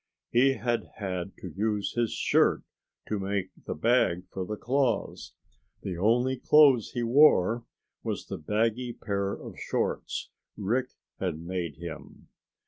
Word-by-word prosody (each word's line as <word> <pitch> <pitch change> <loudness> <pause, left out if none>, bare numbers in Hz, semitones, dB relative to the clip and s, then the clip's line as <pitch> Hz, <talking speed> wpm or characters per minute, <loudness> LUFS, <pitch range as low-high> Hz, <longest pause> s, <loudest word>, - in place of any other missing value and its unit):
He 130 +3 +5
had 120 -3 -2
had 95 -2 -4
to 90 - -6
use 105 +1 -1
his 120 -2 0
shirt - - +2 0.4
to 105 - -1
make 95 -1 -2 0.2
the - - -2
bag 90 -2 +2
for 95 - -3
the 105 +4 -4
claws. 125 -2 -1 0.5
The 95 - -3
only 120 +8 +2
clothes 140 -6 +5
he 120 - -1
wore 120 -4 +5 0.4
was - - -3
the - - -6
baggy 115 +8 0
pair 100 -3 -2
of - - -9
shorts - - -2 0.3
Rick 120 +6 0 0.3
had 90 -5 -2
made 85 -2 -4
him. 85 0 -9
105 Hz, 135 wpm, -28 LUFS, 95-120 Hz, 0.5 s, He